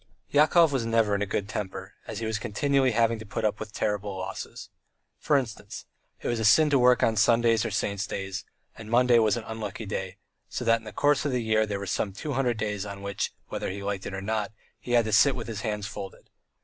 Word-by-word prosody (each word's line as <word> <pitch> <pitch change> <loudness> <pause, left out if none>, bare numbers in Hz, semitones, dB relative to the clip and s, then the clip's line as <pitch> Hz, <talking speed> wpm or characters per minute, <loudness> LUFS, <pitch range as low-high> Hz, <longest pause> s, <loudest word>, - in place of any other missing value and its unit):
Yakov 155 +2 +5
was 135 -4 0
never 115 -2 +2
in 100 - 0
a 105 - 0
good 100 0 -2
temper, 95 -2 -5
as 110 - -5
he 115 - -3
was 110 0 -1
continually 135 +5 +1
having 115 -1 +2
to - - -7
put 110 +1 -3
up 105 0 0
with 110 -1 -6
terrible 105 -2 -2
losses. 95 - -7 0.5
For 145 - +3
instance, 120 -6 -5 0.4
it - - -2
was 120 -1 0
a - - -1
sin 150 +7 +5
to 140 - +4
work 125 0 +5
on 110 - +3
Sundays 115 +1 +4
or - - -1
Saints' 100 -1 -1
days, 95 0 -4 0.3
and 110 - -10
Monday 120 0 +5
was 110 -1 +3
an 115 - -5
unlucky 110 -1 -6
day, 95 -1 -4 0.3
so 125 +6 -4
that 115 0 +4
in 110 - -18
the 110 - -7
course 145 +6 +2
of 145 - -1
the 125 -2 0
year 110 -1 +2
there 105 -1 -2
were 100 - -5
some 100 +1 -1
two 145 +8 -4
hundred 125 -3 0
days 105 -2 -2
on 100 -1 -7
which, 100 -1 -2 0.2
whether - - -3
he 100 +1 -5
liked 100 -1 -3
it - - -6
or 95 - -5
not, 110 +1 -1 0.3
he 120 - -4
had 120 -2 +4
to 110 - -2
sit 135 +6 +5
with 115 -3 -5
his 110 -3 -5
hands 105 -3 -2
folded. 95 -1 -8
110 Hz, 240 wpm, -27 LUFS, 100-120 Hz, 0.5 s, Yakov